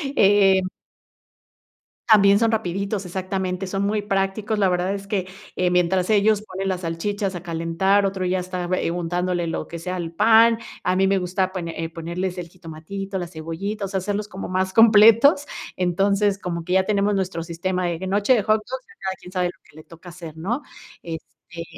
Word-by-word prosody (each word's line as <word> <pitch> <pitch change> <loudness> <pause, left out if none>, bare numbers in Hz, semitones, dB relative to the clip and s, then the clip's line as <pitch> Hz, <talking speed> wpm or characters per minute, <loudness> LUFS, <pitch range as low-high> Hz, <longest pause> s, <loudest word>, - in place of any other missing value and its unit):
eh 195 -1 +5 1.5
también 200 -1 +6
son 230 0 +2
rapiditos, 200 -1 -2
exactamente, 185 0 -3
son 195 +1 -2
muy 210 +1 0
prácticos. 200 +2 -1
La 195 - +4
verdad 180 +2 0
es 200 0 -6
que, 190 -3 -2 0.3
eh, 180 -1 +1
mientras 180 +2 +1
ellos 210 0 +3
ponen 195 -2 -5
las 185 -1 -2
salchichas 190 +3 -2
a 175 - -7
calentar, 170 +4 +1
otro 190 -1 -2
ya 185 +1 0
está 180 -1 -4
bue 180 -2 0
untándole 175 0 -1
lo 165 - -3
que 170 - -7
sea 180 +2 -4
al 170 -2 -4
pan, 225 +5 +5 0.3
a 180 0 +1
mí 190 0 +3
me 195 0 +2
gusta 185 +1 -1
pone 170 -3 -4
eh, 165 - -3
ponerles 170 +3 -4
el 175 -1 -6
jitomatito, 185 +3 -7
la 175 -2 -4
cebollita, 170 +6 -5
o - - -4
sea, 190 0 -2
hacerlos 205 +2 -3
como 190 -2 -7
más 185 0 -1
completos. 225 +6 +6 0.3
Entonces, 195 +3 +1
como 170 -3 -5
que 180 - -2
ya 190 0 +4
tenemos 205 0 +1
nuestro 185 -3 -2
sistema 180 +2 -2
de 170 +2 -3
noche 205 +6 +3
de 215 -5 +2
hot 215 +1 +3
dogs, 260 0 -6
ya - - -17
cada 190 0 -3
quien 180 - -13
sabe 180 -1 0
lo 175 - -10
que - - -21
le 155 - -11
toca 170 +2 -14
hacer, 165 -3 -10
¿no? 225 - -3 0.4
Este, 165 0 -9
190 Hz, 195 wpm, -22 LUFS, 175-200 Hz, 1.5 s, también